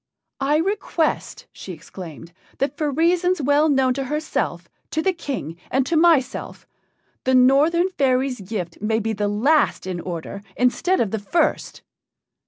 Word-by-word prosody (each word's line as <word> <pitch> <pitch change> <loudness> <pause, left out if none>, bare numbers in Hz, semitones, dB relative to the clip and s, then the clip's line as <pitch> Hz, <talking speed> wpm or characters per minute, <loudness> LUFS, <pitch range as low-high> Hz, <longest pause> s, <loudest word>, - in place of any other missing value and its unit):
"I 280 +2 +2
request," 350 -2 -1
she 185 - -8
exclaimed, 165 0 -10 0.2
"that 275 +1 -1
for 300 0 -1
reasons 345 +5 +2
well 290 +2 +3
known 265 -3 +3
to 270 +1 -3
herself, 300 +4 -2 0.2
to 315 - -2
the 380 - +2
King, 260 - -5
and 265 0 +1
to 335 - -1
myself, 320 -5 +2 0.6
the 260 0 +2
Northern 290 +8 +4
fairy's 260 - 0
gift 185 -4 -5
may 220 +1 +1
be 225 0 -1
the 205 0 -1
last 265 +9 +2
in 185 -2 -4
order 175 +3 -6
instead 345 +9 +1
of 215 -5 0
the 220 - -1
first." 325 - -1
265 Hz, 150 wpm, -22 LUFS, 210-315 Hz, 0.6 s, Northern